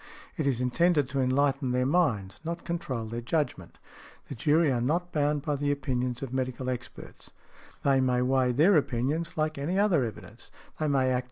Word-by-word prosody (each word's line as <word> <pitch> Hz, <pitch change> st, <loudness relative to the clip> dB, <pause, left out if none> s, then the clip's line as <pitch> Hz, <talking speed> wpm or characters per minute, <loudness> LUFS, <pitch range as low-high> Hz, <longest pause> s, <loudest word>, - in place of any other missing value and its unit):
It 155 Hz, -, -1 dB
is 130 Hz, -4 st, +1 dB
intended 145 Hz, +3 st, +2 dB
to 135 Hz, 0 st, -1 dB
enlighten 135 Hz, 0 st, +1 dB
their 125 Hz, 0 st, +1 dB
minds, 125 Hz, -, +1 dB
not 170 Hz, +1 st, -5 dB
control 130 Hz, -9 st, -3 dB
their 115 Hz, +2 st, -5 dB
judgment. 150 Hz, +5 st, -2 dB, 0.5 s
The -, -, -4 dB
jury 150 Hz, +5 st, +2 dB
are 120 Hz, -2 st, 0 dB
not 170 Hz, +8 st, -1 dB
bound 145 Hz, -2 st, 0 dB
by 150 Hz, -2 st, -1 dB
the 145 Hz, +1 st, -1 dB
opinions 130 Hz, -2 st, -2 dB
of 130 Hz, -2 st, -6 dB
medical 130 Hz, 0 st, -2 dB
experts: 125 Hz, -1 st, -8 dB, 0.5 s
they 135 Hz, -1 st, +3 dB
may 125 Hz, -1 st, +2 dB
weigh 130 Hz, -1 st, +2 dB
their 160 Hz, +10 st, +4 dB
opinions 145 Hz, +5 st, -1 dB
like 155 Hz, -1 st, -1 dB
any 165 Hz, +7 st, -1 dB
other 195 Hz, -9 st, +3 dB
evidence. 110 Hz, 0 st, -8 dB
135 Hz, 165 wpm, -28 LUFS, 125-155 Hz, 0.5 s, their